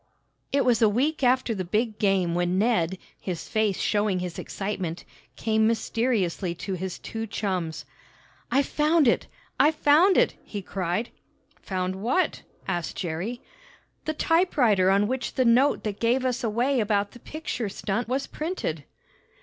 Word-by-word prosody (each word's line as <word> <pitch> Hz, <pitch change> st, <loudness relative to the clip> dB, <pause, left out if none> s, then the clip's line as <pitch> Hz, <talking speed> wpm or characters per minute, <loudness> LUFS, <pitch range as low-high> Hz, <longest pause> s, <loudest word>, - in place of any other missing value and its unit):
It 275 Hz, -1 st, +2 dB
was 240 Hz, -3 st, +3 dB
a 220 Hz, -, +6 dB
week 275 Hz, +9 st, 0 dB
after 250 Hz, -1 st, +3 dB
the 190 Hz, -3 st, -3 dB
big 215 Hz, +4 st, -1 dB
game 190 Hz, -4 st, +2 dB
when 175 Hz, +1 st, +1 dB
Ned, 190 Hz, -5 st, +1 dB, 0.2 s
his 175 Hz, -4 st, -5 dB
face 215 Hz, -3 st, 0 dB
showing 205 Hz, -2 st, +1 dB
his 180 Hz, -1 st, -4 dB
excitement, 190 Hz, -4 st, -4 dB, 0.3 s
came 220 Hz, -1 st, +2 dB
mysteriously 220 Hz, -6 st, 0 dB
to 190 Hz, +3 st, -5 dB
his 185 Hz, 0 st, -4 dB
two 225 Hz, 0 st, -5 dB
chums. 185 Hz, -6 st, -3 dB, 0.6 s
"I've 275 Hz, +1 st, +3 dB
found 305 Hz, 0 st, +3 dB
it! -, -, +2 dB, 0.3 s
I've 300 Hz, +4 st, +5 dB
found 320 Hz, +7 st, +5 dB
it!" -, -, +4 dB
he 205 Hz, -2 st, -6 dB
cried. 185 Hz, +5 st, -2 dB, 0.5 s
"Found 185 Hz, -1 st, -2 dB
what?" 245 Hz, -, 0 dB, 0.3 s
asked 175 Hz, -3 st, -2 dB
Jerry. 185 Hz, +8 st, -3 dB, 0.6 s
"The 310 Hz, -, -1 dB
typewriter 265 Hz, -, +3 dB
on 200 Hz, +2 st, +3 dB
which 260 Hz, +2 st, -3 dB
the 255 Hz, -, +2 dB
note 250 Hz, +5 st, +4 dB
that 205 Hz, -2 st, -4 dB
gave 245 Hz, +3 st, +2 dB
us 255 Hz, -1 st, -1 dB
away 240 Hz, +4 st, +1 dB
about 205 Hz, -2 st, +1 dB
the 240 Hz, -, -13 dB
picture 255 Hz, -6 st, -4 dB
stunt 210 Hz, +3 st, -2 dB
was 265 Hz, +3 st, -1 dB
printed." 300 Hz, -, -4 dB
220 Hz, 150 wpm, -26 LUFS, 190-255 Hz, 0.6 s, a